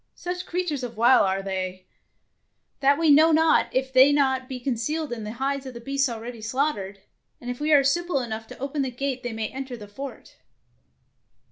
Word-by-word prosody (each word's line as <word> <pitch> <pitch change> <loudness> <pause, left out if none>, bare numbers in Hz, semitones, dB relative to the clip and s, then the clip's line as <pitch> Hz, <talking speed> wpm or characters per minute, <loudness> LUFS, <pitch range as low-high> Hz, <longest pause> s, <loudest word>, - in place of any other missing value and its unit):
Such 360 +1 -5
crea 360 +1 -1
tures 295 -6 -2
of 235 -2 -6
wile 240 +3 +6
are 195 0 -1
they, 185 -1 -4 0.9
that 280 0 +4
we 325 -2 +4
know 315 +3 +6
not 320 +1 +4
if 265 +1 -1
they 260 +1 +8
be - - +3
not 265 -2 +1
concealed 260 +3 -2
in 225 -2 -6
the 210 - -5
hides 270 +2 -2
of 255 - -9
the - - -6
beasts 275 +2 0
already 230 0 -7
slaughtered, 220 -5 -2 0.4
and 245 0 -5
if 245 - -7
we 300 +1 0
are 285 -2 +6
simple 345 +2 +1
enough 225 -2 -5
to - - -11
open 275 +2 -3
the 265 - -1
gate 260 +1 -3
they 245 -1 -4
may 220 -1 -3
enter 265 -2 -6
the 210 -2 -10
fort. 270 +7 -9
260 Hz, 205 wpm, -25 LUFS, 230-280 Hz, 0.9 s, they